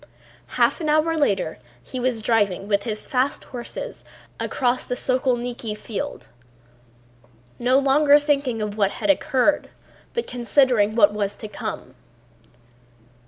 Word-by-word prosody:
Half - - +3
an 310 - -1
hour 310 +2 +2
later 200 - 0 0.2
he 255 - -6
was 245 -3 -1
driving 205 -4 +1
with 200 -1 +1
his 215 -2 -4
fast 260 +2 0
horses 255 - -7 0.4
across 250 -1 0
the 250 - -3
Sokólniki 245 -4 -1
field, 235 +7 -6 1.3
no 250 +2 +3
longer 285 +1 +5
thinking 280 -6 0
of 210 -1 -4
what 200 -3 +2
had - - +2
occurred 295 -1 +1 0.5
but 470 - -1
considering 245 -3 +2
what 210 -3 +5
was 205 -1 -2
to 215 - -8
come. 210 - -6
245 Hz, 125 wpm, -23 LUFS, 215-280 Hz, 1.3 s, longer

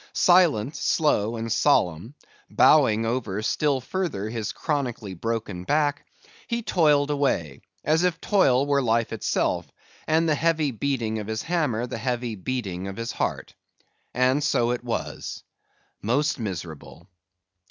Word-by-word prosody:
Silent, 160 - +3
slow, 120 -8 +1
and 115 0 -4
solemn; 110 - +1 0.3
bowing 115 -7 +4
over 115 -4 -2
still 140 +5 +1
further 130 - -3
his 115 -2 -3
chronically 125 - -3
broken 105 -2 -4
back, 145 +4 0 0.4
he 235 -1 -2
toiled 150 -6 +3
away, 85 - -1 0.2
as 155 +3 +2
if 180 -2 +1
toil 140 -10 +3
were 140 -1 +2
life 115 -2 +1
itself, 110 - -1 0.4
and 160 +1 +2
the 155 - +3
heavy 155 -1 +1
beating 115 -3 -2
of 105 - -6
his 110 0 -3
hammer 150 -10 0
the 120 - -6
heavy 120 -1 -2
beating 95 -3 -4
of 95 - -7
his 115 +1 -3
heart. - - -3 0.6
And 130 +3 +2
so 120 -5 +2
it 125 0 -3
was.—Most 125 +3 -4
miserable! 85 -8 -7
125 Hz, 130 wpm, -25 LUFS, 110-150 Hz, 0.6 s, bowing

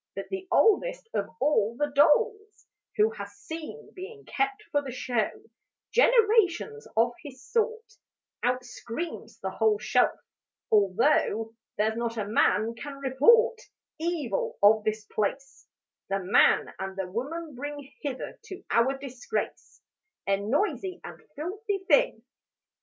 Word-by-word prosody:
But - - -6
the 380 -1 -5
oldest 480 +3 +3
of 200 - -1
all 235 -5 +2
the 295 +1 0
dolls 420 +9 +2 0.3
Who 430 +1 +4
had 465 - -7
seen, 325 +8 -9
being 420 +3 -9
kept 410 +1 -1
for 290 0 +1
show, 245 -3 -1 0.6
Generations 445 -3 +3
of 235 +2 +4
his 270 -5 -11
sort, 455 -1 -1 0.4
Out 250 +1 0
screams 245 +7 -6
the - - -3
whole 430 -1 +2
shelf: - - +2 0.5
'Although 220 +2 +2 0.2
There's 220 +1 +1
not 235 0 -2
a 215 - -1
man 215 +1 +2
can 280 +4 -8
report 375 - +4 0.4
Evil 315 - -2
of 215 +1 +6
this 215 0 -2
place, 265 +7 -3 0.4
The 195 - +1
man 190 0 +3
and 190 0 -5
the 195 - -1
woman 290 - -5
bring 285 +2 -6
Hither 275 -3 -5
to 385 -3 -9
our 260 +4 +3
disgrace, 265 -2 -5 0.4
A 195 0 +2
noisy 360 - -1
and - - -10
filthy 395 +7 -3
thing.' - - +3
290 Hz, 130 wpm, -28 LUFS, -, 0.6 s, of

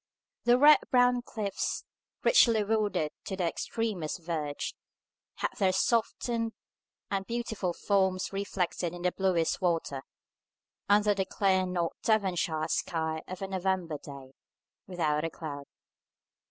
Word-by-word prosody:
The 240 +1 +6
red 295 +3 +8
brown 245 -1 +4
cliffs, 210 -5 -3 0.4
richly 230 - +5
wooded 205 -7 0
to 190 - -3
their 180 -3 0
extremest 195 -7 -3
verge, 155 -4 -3 0.6
had - - -1
their 190 -2 +4
softened 230 +2 0 0.6
and 195 -1 -1
beautiful 230 -6 -2
forms 190 0 0
reflected 180 -3 -2
in 175 - -8
the 180 - +2
bluest 180 -4 +1
water, 165 -6 0 0.9
under 205 0 +5
the 195 -1 -1
clear 190 -1 +1
North 175 -2 -1
Devonshire 175 -7 +1
sky 160 -1 -1
of 185 +1 -6
a - - -2
November 185 -4 -1
day 135 -2 -11 0.5
without 155 -5 0
a 165 - 0
cloud. 145 -3 -7
190 Hz, 125 wpm, -30 LUFS, 165-210 Hz, 0.9 s, red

